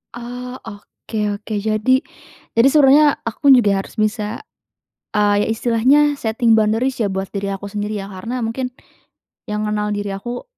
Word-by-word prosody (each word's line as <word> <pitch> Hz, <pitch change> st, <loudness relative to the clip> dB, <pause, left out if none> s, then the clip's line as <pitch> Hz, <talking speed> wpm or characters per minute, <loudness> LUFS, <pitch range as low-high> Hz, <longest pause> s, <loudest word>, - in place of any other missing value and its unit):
Oh 245 Hz, +1 st, -7 dB
oke 220 Hz, +1 st, -10 dB, 0.2 s
oke, 210 Hz, +2 st, -8 dB
jadi 215 Hz, +5 st, +2 dB, 0.6 s
jadi 230 Hz, +3 st, +5 dB
sebenarnya 290 Hz, 0 st, +5 dB
aku 255 Hz, +5 st, +1 dB
pun -, -, +10 dB
juga 205 Hz, -4 st, +2 dB
harus 220 Hz, -, -11 dB
bisa, 215 Hz, 0 st, -1 dB, 0.7 s
eee, 205 Hz, -1 st, +2 dB
ya -, -, -2 dB
istilahnya 235 Hz, +5 st, +3 dB, 0.2 s
setting 230 Hz, -2 st, +2 dB
boundaries 225 Hz, +4 st, +1 dB
ya 205 Hz, -4 st, 0 dB
buat 190 Hz, 0 st, -3 dB
diri 200 Hz, -1 st, -3 dB
aku 195 Hz, +1 st, -5 dB
sendiri 210 Hz, +1 st, -4 dB
ya, 195 Hz, -, -6 dB
karena 205 Hz, +6 st, -5 dB
mungkin 250 Hz, +2 st, -3 dB, 0.8 s
yang 210 Hz, -1 st, -3 dB
ngenal 210 Hz, 0 st, -1 dB
diri 205 Hz, 0 st, -3 dB
aku, 240 Hz, +6 st, -5 dB
220 Hz, 160 wpm, -19 LUFS, 205-245 Hz, 0.8 s, pun